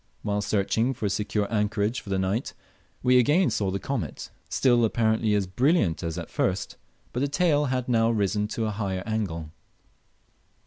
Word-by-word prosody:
While 105 0 0
searching 105 +5 0
for 110 - -4
a 100 - +1
secure 105 +1 -1
anchorage 105 +2 0
for - - -12
the 95 - 0
night 95 +6 -1 0.5
we 125 0 +5
again 150 +9 +3
saw 100 -2 0
the 95 - -1
comet, - - -4 0.2
still 120 -3 +3
apparently 110 -1 +2
as 100 -2 +1
brilliant 115 - +1
as 85 -2 -3
at - - -6
first, - - -1 0.4
but 125 - -1
the 140 - +1
tail 150 -1 +2
had 130 -2 -1
now 115 -2 +3
risen 105 -2 0
to 110 +1 -2
a 110 - -1
higher 95 -3 -3
angle. 90 -8 -3
110 Hz, 175 wpm, -26 LUFS, 100-125 Hz, 0.5 s, we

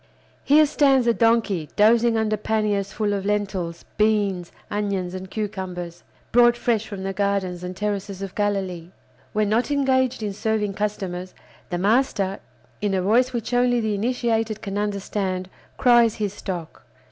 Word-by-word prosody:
Here 305 +2 +6
stands 275 -3 +3
a 235 - +4
donkey, 225 -9 +2
dozing 225 +2 +4
under 215 -1 +1
panniers 210 -2 -1
full 210 -1 -1
of 200 -1 -2
lentils, 195 -5 -2
beans, 205 -5 +1 0.2
onions, 200 -3 -2
and 185 0 -7
cucumbers, 185 -5 -5 0.3
brought 240 0 +5
fresh 225 -3 0
from 195 -2 -6
the 195 0 -2
gardens 190 -3 -1
and 180 0 -6
terraces 200 -1 -3
of 195 - -6
Galilee. 190 -5 -2 0.4
When 215 0 +1
not 230 +6 +1
engaged 260 -4 +1
in 205 -2 -2
serving 210 -1 -1
customers, 190 -3 -4 0.3
the 175 - -2
master, 200 -1 +1 0.4
in 205 -2 0
a 185 - +1
voice 245 +6 +3
which 240 0 -4
only 245 0 +3
the 220 -2 -1
initiated 225 0 -1
can 200 0 -3
understand, 195 -2 -2 0.3
cries 240 -3 +5
his 205 -3 -2
stock. 180 -5 -6
205 Hz, 150 wpm, -23 LUFS, 190-225 Hz, 0.4 s, Here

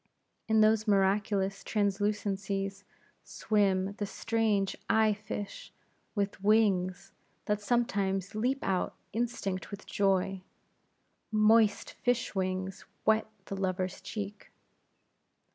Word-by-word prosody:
In 220 0 +4
those 215 0 +4
miraculous 195 0 +2
translucencies 200 -1 -1 0.4
swim 195 -2 +1
the 205 - -1
strange 210 -2 0
eye 220 -1 +4
fish 205 0 -6 0.4
with 200 -1 -2
wings, 195 -3 +2 0.3
that 210 0 0
sometimes 200 -4 0
leap 250 +6 0
out, 185 -2 0 0.2
instinct 225 -5 -2
with 200 -1 -8
joy; 195 -1 +1 0.9
moist 215 0 +4
fish 245 -1 +1
wings 185 -1 -2 0.2
wet 220 0 +3 0.2
the 195 - -5
lover's 185 -1 -2
cheek. 205 -1 -6
200 Hz, 95 wpm, -30 LUFS, 195-215 Hz, 0.9 s, In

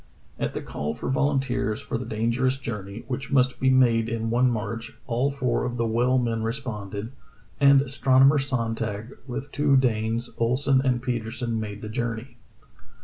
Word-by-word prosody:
At - - -2
the - - -3
call 75 +1 -4
for - - -3
volunteers 135 -6 0
for - - -5
the 125 - -6
dangerous 115 +4 0
journey, 105 -4 -6
which 130 +1 -4
must 130 -2 +3
be 130 - +3
made 120 -3 +4
in 115 -1 -2
one 125 +2 +4
march, 115 0 -4
all 125 +4 +1
four 140 -3 0
of 120 0 -3
the 115 - +1
well 120 +3 +2
men 115 -2 0
responded, 110 -3 -4 0.5
and 140 -1 +6
astronomer 135 +1 +4
Sonntag, 115 -3 -2
with 135 +3 -5
two 145 -2 +3
Danes, 115 -1 0
Ohlsen 130 +3 +2
and 125 -2 +1
Petersen, 120 -1 -2
made 105 -1 -6
the - - -4
journey. 120 +1 -4
120 Hz, 160 wpm, -25 LUFS, 115-130 Hz, 0.5 s, and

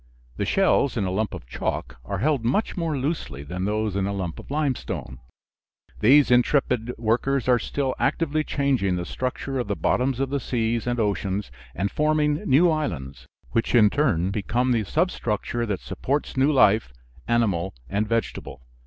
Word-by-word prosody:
The 100 - -1
shells 160 - +2
in 105 - +1
a 95 - -1
lump 105 +2 -1
of - - -8
chalk - - -4
are 100 - -3
held 135 +3 +1
much 135 - 0
more 165 -5 -1
loosely 130 - -3
than 90 +5 -4
those 105 -1 -1
in 100 0 0
a 100 - -2
lump 90 -5 -4
of - - -12
limestone. 135 - -3 0.8
These 135 +4 +5
intrepid 125 -1 +2
workers 120 +4 0
are 125 -1 +4
still 135 0 -2
actively 155 +2 +1
changing 130 -12 0
the 90 -1 -3
structure 130 +3 -3
of 120 - -2
the 100 - -1
bottoms 125 - 0
of 135 +1 -1
seas 115 -1 -1
and 120 0 0
oceans, 100 -3 -1 0.2
and 100 +4 -1
forming 150 -1 +1
new 145 +7 +6
islands, 70 - -4 0.2
which 115 +2 0
in 105 -3 +6
turn 100 - +1
become 120 +5 0
the 115 -3 +1
substructure 120 - -1
that 100 -4 -2
supports 145 +3 -2
new 135 +3 +3
life, 110 - +4 0.4
animal 100 - +1
and 105 +2 -1
vegetable. 115 - -3
120 Hz, 165 wpm, -24 LUFS, 100-140 Hz, 0.8 s, new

